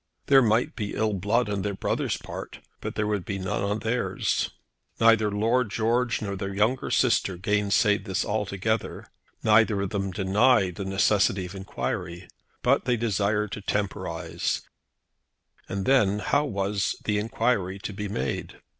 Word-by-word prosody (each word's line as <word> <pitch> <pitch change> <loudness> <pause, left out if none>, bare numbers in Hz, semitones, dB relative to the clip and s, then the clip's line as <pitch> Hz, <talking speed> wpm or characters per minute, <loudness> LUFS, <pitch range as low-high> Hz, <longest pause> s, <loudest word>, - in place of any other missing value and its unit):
There 135 -1 +6
might 115 0 +2
be 105 -3 -4
ill 110 -1 +1
blood 105 +5 +1
on 100 -1 -2
their 100 0 -2
brother's - - -1
part, - - -8 0.2
but - - -5
there 110 - 0
would 105 -3 -1
be 100 +3 -4
none 95 0 -2
on 100 +1 0
theirs. 115 +2 0 0.5
Neither 115 -2 +5
Lord 115 +4 +1
George 115 +3 0
nor 100 -1 -3
their 100 0 -4
younger 110 +6 +1
sister 115 -7 +2
gainsayed 105 +2 +2
this 95 -3 -1
altogether. 105 +1 -2 0.4
Neither 110 -1 +4
of 100 -1 -2
them 100 -1 -1
denied 100 +1 +3
the 100 - -4
necessity 95 -1 +2
of 90 - -8
enquiry. 90 -2 -4 0.4
But - - +3
they 125 -1 +2
desired 105 -2 0
to 105 - -5
temporise; 100 0 -2 1.1
and 95 0 -3
then 105 -7 +4
how 145 +7 +1
was 100 - -1
the 105 -1 +1
enquiry 105 -3 0
to 100 +1 -6
be 105 +1 -4
made? 70 -9 -4
105 Hz, 155 wpm, -26 LUFS, 100-110 Hz, 1.1 s, There